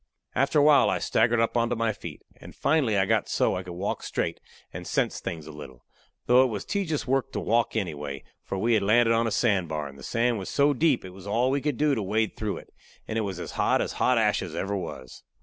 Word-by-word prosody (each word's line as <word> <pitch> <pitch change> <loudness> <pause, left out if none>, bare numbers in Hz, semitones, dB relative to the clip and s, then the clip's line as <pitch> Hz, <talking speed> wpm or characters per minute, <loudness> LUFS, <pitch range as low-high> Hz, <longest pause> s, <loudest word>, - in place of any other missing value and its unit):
After 140 +3 +1
awhile 145 0 +6
I - - +1
staggered 115 +1 +2
up 115 +1 +1
onto 120 0 +1
my 115 -1 0
feet, 85 -6 -9
and - - -13
finally 135 -9 +2
I 95 - +3
got 110 +1 +1
so - - +1
I 90 - -3
could 90 -1 -8
walk 95 +3 -3
straight - - -3 0.3
and - - -7
sense - - 0
things 80 -3 -6
a 80 - -9
little; 65 -5 -11 0.4
though 125 +1 +6
it - - +2
was 105 -5 -5
tejus 180 -8 -2
work 135 0 0
to - - -2
walk 115 +1 +1
anyway, 75 -9 -4 0.2
for 95 - -4
we 115 +5 +1
had 110 - +3
landed 115 +3 +4
on 115 0 +2
a - - -2
sand 100 -9 +1
bar, 75 -2 -3
and 70 0 -12
the - - -12
sand 120 -1 0
was 95 - -6
so 145 +1 +3
deep 155 - +1
it 95 - -8
was 95 +1 -12
all 120 +5 +1
we 140 +1 0
could 145 -3 -1
do 150 -1 +2
to 115 - -1
wade 110 +3 0
through 105 -2 -3
it, - - -13 0.3
and 110 - -4
it - - +1
was 95 -4 -4
as - - -6
hot - - +1
as - - -1
hot 125 - +2
ashes 105 -6 0
ever 100 +1 -2
was. 65 -9 -7
110 Hz, 250 wpm, -26 LUFS, 95-125 Hz, 0.4 s, awhile